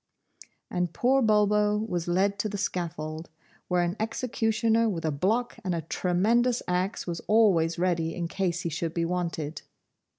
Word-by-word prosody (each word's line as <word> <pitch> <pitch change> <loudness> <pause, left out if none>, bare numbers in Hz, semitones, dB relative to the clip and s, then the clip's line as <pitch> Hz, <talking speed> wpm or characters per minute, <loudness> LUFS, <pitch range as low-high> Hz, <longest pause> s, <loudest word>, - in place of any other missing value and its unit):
And 175 -2 -1
poor 265 +2 +3
Bulbo 210 -1 +3
was 180 -6 -2
led 195 +3 +1
to 215 - 0
the 205 - -4
scaffold, 160 -4 -4 0.4
where 180 -1 +2
an 175 +1 -1
executioner 225 0 +1
with 165 -5 -3
a 155 - +1
block 220 +12 0
and 180 -3 -1
a 165 - -3
tremendous 225 +9 +1
axe 180 +3 -1
was 170 -2 -4
always 185 -7 +4
ready 170 -2 0
in 170 -1 -2
case 180 0 -1
he 170 - -2
should 165 +1 -3
be 170 -1 +1
wanted. 165 -3 -3
180 Hz, 160 wpm, -27 LUFS, 170-215 Hz, 0.4 s, always